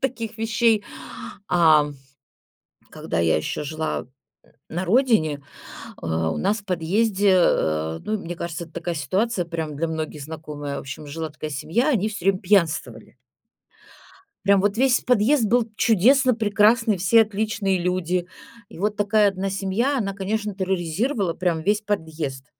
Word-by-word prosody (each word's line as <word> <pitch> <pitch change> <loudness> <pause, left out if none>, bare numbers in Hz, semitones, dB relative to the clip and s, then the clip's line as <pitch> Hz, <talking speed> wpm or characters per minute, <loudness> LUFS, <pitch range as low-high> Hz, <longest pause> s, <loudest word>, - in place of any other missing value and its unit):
таких 230 -4 -3
вещей, 225 -1 +2 0.6
ам, 155 -4 +4 1.0
когда 85 - -3
я 80 -2 +3
ещё 80 - -3
жила 155 +2 -3
н - - -10 0.6
на 175 +3 -3
родине, 205 - +2 0.6
э, - - -5
у 80 0 -1
нас 205 +4 0
в 200 - -12
подъезде, 195 +3 +1
э, 80 - +1
ну, 215 0 -1
мне 175 -3 -6
кажется, 170 0 -5
это 165 - -19
такая 170 0 -3
ситуация 185 - -1
прям 160 -3 -4
для 165 +2 -1
многих 155 -2 -4
знакомая. 150 -2 -6
В - - -4
общем, 135 +2 -8
жила 160 +1 -5
такая 155 0 -7
семья, 165 - 0
они 215 -6 +1
всё 205 -4 -6
время 195 -1 +3
пьянствовали. 175 -5 0 1.3
Прям 200 -1 +4
вот 205 +1 +1
весь 255 +1 +3
подъезд 245 +2 +3
был 230 +1 +2
чудесно, 245 +5 +4
прекрасный, 215 0 +3
все 225 +5 +5
отличные 205 -2 -1
люди. 180 0 -1 0.4
И - - -13
вот 210 +3 -1
такая 205 0 +3
1 195 0 -3
семья, 210 +8 0
она, 195 -3 -2
конечно, 210 +1 -3
терроризировала 190 - -1
прям 170 -3 -1
весь 205 +4 +1
подъезд. 160 -10 -4
190 Hz, 150 wpm, -23 LUFS, 160-215 Hz, 1.3 s, все